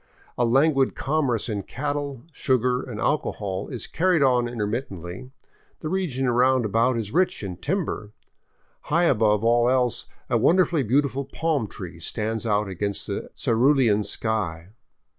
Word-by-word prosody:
A 120 - +1
languid 135 +2 +3
commerce 135 -6 0
in 105 -3 -2
cattle, 145 +1 -4
sugar, 125 -2 +1
and 120 -6 -7
alcohol 100 -10 -1
is 125 -7 -5
carried 175 -3 +2
on 125 -2 +3
intermittently; 105 -2 -4 0.5
the 155 - -3
region 155 -8 -1
round 125 0 +3
about 115 +4 +2
is 110 -3 -4
rich 185 - +1
in 90 -3 -5
timber. 150 - -3 0.7
High 170 +3 +2
above 110 - +3
all 120 +1 +4
else 125 -3 +1 0.2
a - - +1
wonderfully 175 -3 +3
beautiful 135 +3 +1
palm 150 -4 -1
tree 90 -5 -9
stands 110 +5 -2
out 105 -1 +1
against 100 +1 -3
the - - -4
cerulean 120 -2 +3
sky. 95 -6 -2
125 Hz, 140 wpm, -24 LUFS, 105-140 Hz, 0.7 s, all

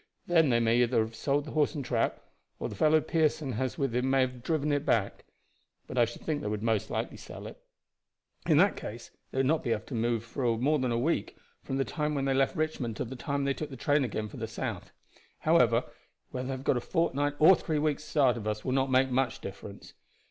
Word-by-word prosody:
Then 165 -4 +4
they 120 -1 +3
may 115 +1 +3
either 120 -1 +2
have 110 +1 -3
sold 140 +5 0
the 155 - -7
horse 150 0 +1
and 140 -3 -4
trap, 120 -2 0 0.4
or - - -3
the - - -7
fellow 155 0 +4
Pearson 155 -4 0
has 125 +1 -2
with 135 -4 -1
him 125 +2 +1
may 135 0 +4
have 125 -1 -2
driven 150 +1 0
it 145 -1 +1
back. 105 -8 0 0.6
But 125 - -3
I 120 - +6
should 120 - -9
think 150 -2 -1
they - - -4
would 105 0 -3
most 110 -3 0
likely - - -3
sell - - -10
it. - - -10 0.9
In - - +5
that - - +5
case - - -8 0.2
they - - -8
would 135 - +3
not 155 +4 +2
be 115 - 0 0.2
more 120 +4 0
than 130 -2 0
a 115 - +1
week 150 +8 -1 0.2
from 135 - -3
the 135 - +1
time 150 -2 -2
they 135 - +2
left 135 +5 +2
Richmond 155 -8 -2
to - - -2
the 130 +3 -7
time 140 +2 -2
they 140 0 +1
took 140 -2 -6
train 145 +3 +2
again 110 -3 -3
for - - -10
the - - -4
south. - - -5 0.5
However, - - +4 0.5
whether 125 0 -4
they 135 - -2
have 130 0 -6
got 130 - +2
a - - -2
fortnight 145 -3 0
or 160 +6 +8
three 155 -3 -2
weeks' 150 0 0
start 135 -5 +2
of 110 -2 -5
us 105 0 -3
will 130 - 0
not 135 +1 +1
make 130 0 +3
much 125 -1 0
difference. 100 +1 -9
130 Hz, 230 wpm, -29 LUFS, 120-150 Hz, 0.9 s, or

